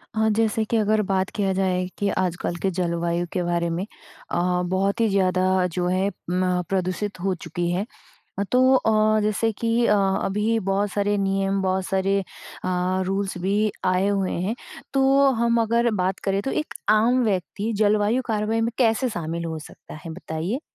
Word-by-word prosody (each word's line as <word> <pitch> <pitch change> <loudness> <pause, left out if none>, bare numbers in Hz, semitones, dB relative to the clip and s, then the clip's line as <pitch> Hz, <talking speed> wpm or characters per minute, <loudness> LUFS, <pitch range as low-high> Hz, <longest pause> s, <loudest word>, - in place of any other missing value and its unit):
हाँ, 220 0 +2
जैसे 220 0 +1
कि 230 - 0
अगर 215 0 +2
बात 190 -1 0
किया 195 -2 +1
जाए 185 -1 0
कि 205 - 0
आजकल 175 -2 -1
के 195 - +1
जलवायु 170 -1 -1
के 180 - 0
बारे 170 0 0
में 170 +3 -2 0.5
अ, 180 0 +1
बहुत 190 +3 0
ही 225 - +4
ज़्यादा 185 -1 +2
जो 180 -1 0
है 185 +2 +1 0.2
म 180 0 +1
प्रदूषित 190 +2 -2
हो 190 +2 0
चुकी 170 +1 -3
है। 185 +4 -1 0.5
अ, - - +1
तो 255 +1 +5
अ, 215 -3 +3
जैसे 215 +2 +1
कि 230 +2 +1
अ, - - +4
अभी 200 +3 +1
बहुत 200 +1 +1
सारे 205 0 +1
नियम 195 0 0
बहुत 190 0 0
सारे 195 +1 +1 0.5
अ, 185 +1 0
रूल्स 195 0 -2
भी 200 +3 +1
आए 185 +1 +2
हुए 195 -2 0
हैं। 205 +5 -1 0.4
तो 275 0 +4
हम 235 0 +3
अगर 235 +1 +2
बात 190 +1 -1
करें, 195 0 +1
तो 270 - -2
एक 305 - -3 0.2
आम 235 +4 +4
व्यक्ति 205 +2 -1
जलवायु 215 +4 +2
कार्रवाई 220 0 0
में 230 +1 +1
कैसे 250 +1 +2
शामिल 170 -5 -4
हो 160 -1 -4
सकता 155 - -12
है? 165 - -6
बताइए। 170 - -4
195 Hz, 175 wpm, -23 LUFS, 185-215 Hz, 0.5 s, तो